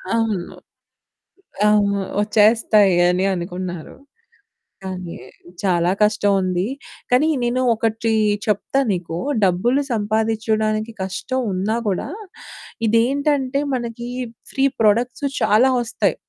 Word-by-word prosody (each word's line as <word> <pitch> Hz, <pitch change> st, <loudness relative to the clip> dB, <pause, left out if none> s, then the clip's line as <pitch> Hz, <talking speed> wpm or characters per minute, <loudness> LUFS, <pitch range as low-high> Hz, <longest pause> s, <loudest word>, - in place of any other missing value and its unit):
అవును. 215 Hz, -6 st, -2 dB, 1.1 s
ఆ! -, -, +5 dB, 0.5 s
వచ్చేస్తాయి 210 Hz, -2 st, +4 dB, 0.2 s
అని 185 Hz, +2 st, 0 dB
అనుకున్నారు. 175 Hz, -1 st, -5 dB, 0.9 s
కానీ 185 Hz, -2 st, -6 dB, 0.5 s
చాలా 175 Hz, -2 st, +2 dB
కష్టం 210 Hz, -1 st, +3 dB
ఉంది. 185 Hz, 0 st, -1 dB, 0.5 s
కానీ 260 Hz, +6 st, +4 dB, 0.2 s
నేను 240 Hz, +2 st, 0 dB
ఒకటి 225 Hz, 0 st, -1 dB, 0.3 s
చెప్తా 215 Hz, +6 st, 0 dB
నీకు. 175 Hz, -3 st, -3 dB, 0.3 s
డబ్బులు 230 Hz, +10 st, +2 dB
సంపాదించడానికి 220 Hz, 0 st, 0 dB
కష్టం 190 Hz, +7 st, -3 dB
ఉన్నా 200 Hz, +5 st, -1 dB
కూడా 190 Hz, +5 st, -1 dB, 0.8 s
ఇదేంటంటే 270 Hz, +4 st, +1 dB
మనకి 235 Hz, -1 st, -4 dB, 0.4 s
ఫ్రీ 270 Hz, 0 st, +1 dB
ప్రొడక్ట్స్ 235 Hz, +6 st, +2 dB, 0.2 s
చాలా 240 Hz, +5 st, +4 dB
వస్తాయి. 235 Hz, +1 st, -1 dB
215 Hz, 90 wpm, -20 LUFS, 185-235 Hz, 1.1 s, ఆ